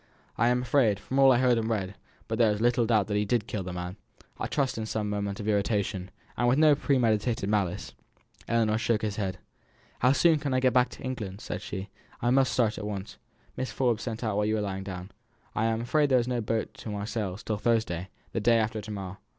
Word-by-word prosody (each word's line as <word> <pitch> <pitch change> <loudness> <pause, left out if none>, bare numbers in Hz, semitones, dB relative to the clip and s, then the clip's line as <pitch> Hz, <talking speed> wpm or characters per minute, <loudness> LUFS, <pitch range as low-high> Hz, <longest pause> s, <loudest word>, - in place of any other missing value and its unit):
"I 120 - +2
am 125 0 +2
afraid, 120 -6 +3
from 135 +5 -2
all 135 -1 +8
I 125 - +5
heard 125 -2 +3
and 110 0 -2
read, 100 -4 -1 0.3
there 115 0 +3
is 105 - 0
but 110 - -3
little 120 -1 +3
doubt 110 -4 +3
that 105 0 -1
he 105 - +2
did 110 +1 0
kill 105 -3 -3
the 90 0 -5
man; 90 +2 -5 0.4
I - - -2
trust 135 -5 -1
in 110 - -3
some 105 -2 -2
moment 100 -1 -2
of 105 - -5
irritation, 100 -2 0 0.3
with 120 +2 +4
no 155 -1 +6
premeditated 120 -6 +1
malice." 100 -4 -1 0.5
Ellinor 110 -2 +2
shook 115 -1 +1
her 105 - 0
head. 95 -2 -3 0.6
"How 125 - +4
soon 160 +1 +4
can 140 -3 -1
I - - +3
get 130 -2 +3
to 125 +2 +1
England?" 110 -6 -5
asked - - -4
she. 95 0 -6 0.3
"I 120 - +1
must 135 0 +4
start 110 -4 +1
at 105 - -4
once." 100 -2 -6 0.4
"Mrs. 130 - -3
Forbes 120 -5 +1
sent 115 -1 -4
out 110 -3 0
while 105 - +2
you 110 - +1
were 110 - 0
lying 95 -1 -3
down. 95 0 -7 0.4
I 110 - 0
am 115 0 0
afraid 145 +4 +2
there 130 - +5
is 120 -1 +1
no 125 -2 0
boat 110 +1 -2
to - - -7
Marseilles 105 -1 -3
till 110 - -2
Thursday, 105 -6 0 0.2
the - - -1
day 115 +2 +4
after 110 -1 0
to 105 - -10
morrow." 95 -2 -5
110 Hz, 230 wpm, -28 LUFS, 100-120 Hz, 0.6 s, all